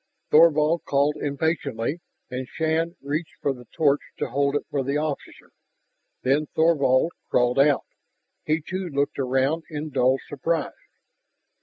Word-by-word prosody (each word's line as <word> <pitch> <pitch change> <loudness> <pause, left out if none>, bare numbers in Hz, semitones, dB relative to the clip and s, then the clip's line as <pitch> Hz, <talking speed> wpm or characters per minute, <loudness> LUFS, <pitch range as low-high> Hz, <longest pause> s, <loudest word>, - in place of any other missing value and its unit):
Thorvald 155 +1 +5
called 145 +1 +2
impatiently, 145 -2 -1 0.3
and 125 0 -4
Shann 160 +3 -1
reached 155 +4 -3
for 140 - 0
the 125 -2 -13
torch 145 +2 +2 0.2
to - - -2
hold 140 +1 +1
it 145 - -1
for 140 -2 0
the 140 +2 -1
officer. 150 -2 -5 0.7
Then 145 +4 +2
Thorvald 160 -2 +3 0.2
crawled 125 +1 +2
out; 140 -1 +4 0.6
he, 155 +1 0
too, 185 0 -3
looked 140 -1 -1
around 135 +4 +1
in 155 -1 -5
dull 130 0 +3
surprise. 155 +2 -1
145 Hz, 135 wpm, -24 LUFS, 135-160 Hz, 0.7 s, Thorvald